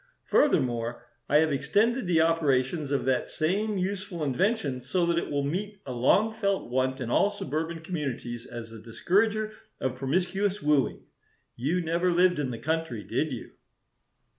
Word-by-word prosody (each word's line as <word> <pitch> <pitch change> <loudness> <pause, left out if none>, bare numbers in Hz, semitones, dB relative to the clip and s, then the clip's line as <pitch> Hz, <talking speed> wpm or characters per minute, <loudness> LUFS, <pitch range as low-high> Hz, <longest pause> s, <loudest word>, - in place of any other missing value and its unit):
Furthermore, 120 - +1 0.2
I 145 - +5
have 160 -1 +2
extended 215 - +1
the 165 -2 +4
operations 150 -2 +1
of 140 - 0
that 130 -1 +1
same 200 +6 0
useful 190 -2 -3
invention 145 - 0
so 170 +8 0
that 170 0 +2
it - - -5
will 145 -1 0
meet 195 +8 -3
a 130 - -5
long 200 - +3
felt 200 - -1
want 130 +1 0
in 120 -2 -3
all 200 - +4
suburban 165 -3 -4
communities 135 -8 -4
as 115 -2 -8
a 115 -1 -10
discourager 210 - +1 0.3
of 130 -1 -2
promiscuous 185 +8 0
wooing. 150 -5 +1 0.5
You 155 +9 0
never 170 +2 +1
lived 180 -1 +3
in 140 -3 -1
the 120 - -4
country, 160 -7 -2
did - - -1
you?" - - -6
160 Hz, 160 wpm, -28 LUFS, 130-190 Hz, 0.5 s, I